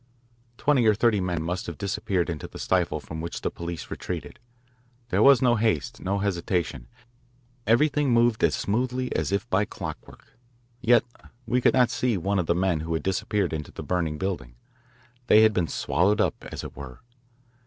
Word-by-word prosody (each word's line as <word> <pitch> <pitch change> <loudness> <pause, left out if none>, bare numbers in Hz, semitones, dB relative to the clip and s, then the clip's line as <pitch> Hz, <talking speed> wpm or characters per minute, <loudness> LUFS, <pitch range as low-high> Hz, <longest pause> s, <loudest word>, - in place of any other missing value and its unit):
Twenty 140 -6 +3
or 105 - +5
thirty 110 -2 +2
men 90 -3 -2
must 90 +2 -3
have 85 - -6
disappeared 95 -2 -1
into 85 -4 -5
the - - -11
stifle - - 0
from 80 0 -7
which 85 - -5
the - - -2
police 85 -2 -7
retreated. 90 +7 -6 0.7
There - - +1
was 135 -2 +6
no 120 -2 +4
haste, 110 +1 0
no 100 +2 -1
hesitation. 85 -9 -2 0.8
Everything 145 +5 +3
moved 120 -1 +3
as - - +3
smoothly 125 +4 -1
as - - -1
if 100 +4 -1
by 100 +2 +3
clockwork. 115 - -9 0.4
Yet 120 -1 +5 0.4
we 125 +1 +1
could - - +4
not 125 -2 +4
see 125 -6 0
one 100 +3 0
of 85 - -1
the 85 - +2
men 90 -2 +1
who 80 +1 -3
had 80 - -3
disappeared 95 -1 -1
into 75 -2 -5
the - - -8
burning 85 -4 -1
building. 85 -10 -4 0.7
They 110 -1 +7
had 110 0 +5
been 90 -4 0
swallowed 100 +7 +1
up, - - 0
as - - -6
it - - -8
were. 65 -2 -10
100 Hz, 180 wpm, -26 LUFS, 85-120 Hz, 0.8 s, They